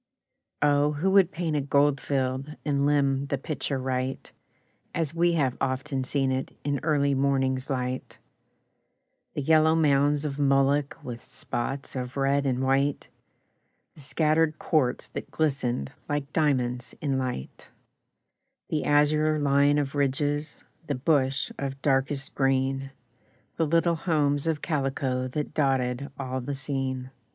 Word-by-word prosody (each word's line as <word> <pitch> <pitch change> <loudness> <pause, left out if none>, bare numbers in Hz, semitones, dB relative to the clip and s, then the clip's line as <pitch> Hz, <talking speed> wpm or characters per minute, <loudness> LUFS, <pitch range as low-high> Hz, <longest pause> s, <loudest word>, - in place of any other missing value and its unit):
Oh, 145 0 +3
who 170 +7 0
would 195 -3 +5
paint 160 -1 -2
a 145 - +1
goldfield, 140 0 0
And 140 -1 +1
limn 140 -1 +2
the 140 - -1
picture 140 0 -3
right, 130 0 -3 0.6
As 160 -3 -1
we 170 +1 +2
have 140 -6 +1
often 135 +1 -1
seen 135 0 0
it 130 0 -3
In 145 -1 -1
early 145 -2 +2
morning's 135 -1 +1
light; 130 -1 -3 1.2
The 145 - -2
yellow 160 +2 +5
mounds 145 -1 +3
of 145 -1 -3
mullock 140 0 +2
With 120 -2 -7
spots 135 +4 -4
of 125 0 -4
red 140 +1 +2
and 130 0 0
white, 135 +2 +1 0.8
The 150 - -14
scattered 155 +2 +1
quartz 130 -6 0
that - - -6
glistened 130 - -1 0.2
Like 145 -1 -2
diamonds 125 -5 0
in 135 -3 0
light; 125 - -5 1.0
The 155 - -1
azure 150 +1 +3
line 145 0 +3
of 140 -2 -1
ridges, 145 +2 -1 0.2
The 145 - -1
bush 135 0 +1
of 135 -1 -4
darkest 135 0 0
green, 135 0 +1 0.7
The 165 - +1
little 170 +2 +3
homes 150 -3 +1
of 155 -3 -1
calico 135 -4 -1
That 150 +3 -4
dotted 135 -2 0
all 130 -1 -3
the 140 +3 -4
scene. 135 -2 -3
140 Hz, 135 wpm, -27 LUFS, 130-150 Hz, 1.2 s, would